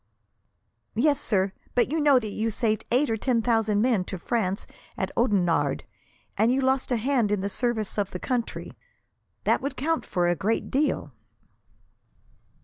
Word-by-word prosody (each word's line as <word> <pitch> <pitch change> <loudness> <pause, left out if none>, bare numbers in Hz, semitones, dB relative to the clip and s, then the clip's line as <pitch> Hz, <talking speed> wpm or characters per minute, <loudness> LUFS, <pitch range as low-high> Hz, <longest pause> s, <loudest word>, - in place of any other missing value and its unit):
"Yes, 285 +4 +2
sir; 195 -2 0 0.2
but 245 +1 +2
you 320 - +1
know 290 -3 +5
that 220 -4 -2
you 220 +2 -1
saved 220 -1 -1
eight 255 +2 +2
or 225 - 0
ten 235 0 +1
thousand 220 -3 +2
men 235 -7 +2
to 190 - -5
France 195 0 -1 0.3
at 190 0 -2
Oudenarde, 195 -8 +1 0.5
and 225 +2 +3
you 260 - +2
lost 265 0 +1
a 245 - +3
hand 240 -2 +1
in 205 -2 +1
the 200 - -2
service 220 -2 -1
of 200 -1 0
the - - -5
country. 240 +4 -3 0.7
That - - +2
would 280 - -3
count 325 +4 0
for 175 -1 0
a 175 - +2
great 215 +7 -1
deal." 270 - 0
225 Hz, 165 wpm, -26 LUFS, 200-260 Hz, 0.7 s, know